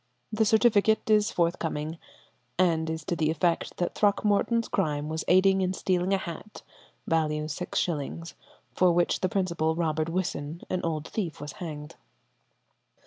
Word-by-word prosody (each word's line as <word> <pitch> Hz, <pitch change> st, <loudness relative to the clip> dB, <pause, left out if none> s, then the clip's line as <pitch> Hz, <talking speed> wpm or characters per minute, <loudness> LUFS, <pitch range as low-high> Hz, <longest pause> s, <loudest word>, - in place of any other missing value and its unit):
The 220 Hz, +1 st, +2 dB
certificate 220 Hz, -1 st, +3 dB
is 210 Hz, 0 st, +4 dB
forthcoming, 165 Hz, -3 st, -1 dB, 0.6 s
and 165 Hz, -3 st, +2 dB
is 160 Hz, 0 st, -4 dB
to 175 Hz, -, -1 dB
the 155 Hz, -2 st, +1 dB
effect 165 Hz, +2 st, 0 dB
that 175 Hz, -, -1 dB
Throckmorton's 210 Hz, +3 st, +2 dB
crime 150 Hz, -5 st, -1 dB
was 160 Hz, 0 st, -3 dB
aiding 190 Hz, +1 st, +4 dB
in 185 Hz, 0 st, 0 dB
stealing 185 Hz, 0 st, 0 dB
a 195 Hz, -, +4 dB
hat, 190 Hz, +4 st, -8 dB, 0.4 s
value 155 Hz, -2 st, 0 dB
6_s._, 165 Hz, 0 st, -3 dB, 0.4 s
for 185 Hz, -1 st, +4 dB
which 175 Hz, 0 st, +1 dB
the 185 Hz, -, 0 dB
principal, 170 Hz, -5 st, 0 dB
Robert 160 Hz, -1 st, -1 dB
Whisson, 165 Hz, -3 st, -3 dB
an 185 Hz, -, 0 dB
old 160 Hz, -2 st, -2 dB
thief, 180 Hz, -8 st, -4 dB
was 145 Hz, +1 st, -6 dB
hanged. 150 Hz, -4 st, -8 dB
170 Hz, 140 wpm, -27 LUFS, 160-190 Hz, 0.6 s, is